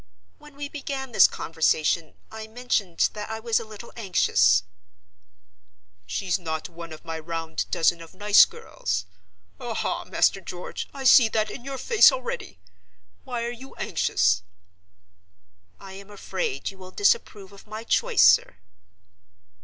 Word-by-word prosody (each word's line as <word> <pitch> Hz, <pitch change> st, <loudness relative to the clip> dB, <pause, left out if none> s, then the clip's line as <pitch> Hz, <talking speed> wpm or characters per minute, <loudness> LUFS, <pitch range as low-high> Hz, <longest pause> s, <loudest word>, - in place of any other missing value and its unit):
When 295 Hz, -1 st, -16 dB
we 285 Hz, 0 st, -5 dB
began 275 Hz, -3 st, -6 dB
this -, -, +7 dB
conversation, 160 Hz, 0 st, 0 dB, 0.2 s
I 220 Hz, 0 st, -8 dB
mentioned 220 Hz, -6 st, 0 dB
that 210 Hz, 0 st, -6 dB
I 220 Hz, 0 st, -4 dB
was 230 Hz, 0 st, +1 dB
a -, -, -6 dB
little 215 Hz, +1 st, -12 dB
anxious—" 185 Hz, -, +3 dB, 1.4 s
"She's 180 Hz, -, -1 dB
not 160 Hz, -2 st, -4 dB
one 170 Hz, 0 st, -10 dB
of 155 Hz, -, -11 dB
my 165 Hz, -1 st, -5 dB
round 165 Hz, 0 st, -4 dB
dozen 165 Hz, 0 st, +1 dB
of 165 Hz, -, -13 dB
nice 205 Hz, 0 st, +6 dB
girls—aha, 90 Hz, +1 st, -5 dB
Master 195 Hz, -, +1 dB
George, 180 Hz, -1 st, -7 dB
I 275 Hz, -1 st, -8 dB
see 245 Hz, -3 st, +7 dB
that 215 Hz, -1 st, -1 dB
in -, -, -9 dB
your 275 Hz, 0 st, -5 dB
face 435 Hz, -, +6 dB
already! -, -, -5 dB, 0.7 s
Why 245 Hz, -3 st, -3 dB
are 235 Hz, -, -3 dB
you 255 Hz, +3 st, -11 dB
anxious?" 90 Hz, -, +1 dB, 1.4 s
"I 190 Hz, -1 st, -11 dB
am 195 Hz, +1 st, -11 dB
afraid 390 Hz, -, -4 dB
you 195 Hz, -, -18 dB
will 185 Hz, 0 st, -10 dB
disapprove 210 Hz, -, 0 dB
of 200 Hz, +1 st, -16 dB
my 215 Hz, +1 st, -7 dB
choice, -, -, +2 dB
sir." -, -, +4 dB
205 Hz, 140 wpm, -25 LUFS, 165-245 Hz, 1.4 s, this